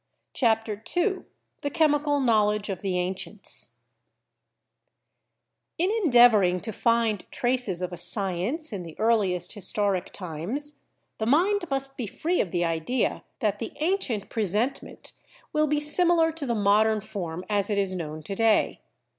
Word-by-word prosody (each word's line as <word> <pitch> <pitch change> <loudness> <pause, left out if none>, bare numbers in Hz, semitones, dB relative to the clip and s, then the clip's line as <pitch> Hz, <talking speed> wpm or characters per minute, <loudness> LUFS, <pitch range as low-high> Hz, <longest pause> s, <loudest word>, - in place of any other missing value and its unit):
CHAPTER 225 -3 0
II 380 +1 +1 0.4
THE 285 - -2
CHEMICAL 295 -2 +2
KNOWLEDGE 210 -4 +2
OF 185 -2 -4
THE 190 -2 -1
ANCIENTS 190 +3 -3 2.0
In 360 +4 +1
endeavoring 240 - +5
to 225 - -2
find 230 -2 +1
traces 240 -8 -1
of 180 0 -4
a - - -6
science 195 - 0
in 195 - -4
the 165 -2 -10
earliest 205 -6 +1
historic 200 -2 0
times, 205 - -4 0.4
the 220 - -1
mind 360 - +3
must 270 0 +1
be 240 - -3
free 340 - 0
of 180 - -4
the 175 -1 0
idea 165 +10 -1 0.2
that 210 -2 0
the 225 - -5
ancient 300 - -1
presentment 220 +5 -1 0.4
will 305 0 +2
be 300 0 +1
similar 325 +2 +3
to 310 -3 -3
the 235 - 0
modern 215 +1 +3
form 185 -4 -6
as 205 -1 0
it 205 - 0
is 195 -2 +1
known 155 -3 -5
to 195 - -5
day. 225 +1 +2
220 Hz, 145 wpm, -26 LUFS, 190-280 Hz, 2.0 s, endeavoring